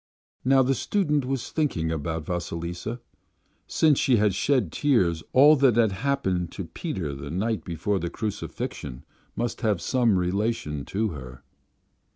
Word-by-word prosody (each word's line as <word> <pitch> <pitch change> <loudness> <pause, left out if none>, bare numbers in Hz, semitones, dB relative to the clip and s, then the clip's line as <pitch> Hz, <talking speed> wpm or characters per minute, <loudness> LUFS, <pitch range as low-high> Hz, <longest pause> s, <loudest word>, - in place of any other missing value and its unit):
Now 135 +1 +5
the 135 +2 +2
student 150 - 0
was 130 -2 -3
thinking 85 - 0
about 80 0 -3
Vasilisa: 90 +5 -4 0.7
since 155 -4 +3
she 125 -3 +3
had 105 -2 +3
shed 105 - +1
tears 90 - +2
all 145 +4 +7
that 130 -4 +4
had 115 -3 +4
happened 95 -7 -1
to 95 - -5
Peter 85 - -4
the 70 +1 -7
night 105 +7 -1
before 95 +3 -1
the 85 - -3
Crucifixion 100 - -5 0.3
must 120 -1 -3
have 105 -6 +1
some 115 - +2
relation 90 -5 -1
to 110 +2 -1
her.... 65 -5 -9
105 Hz, 145 wpm, -26 LUFS, 85-130 Hz, 0.7 s, all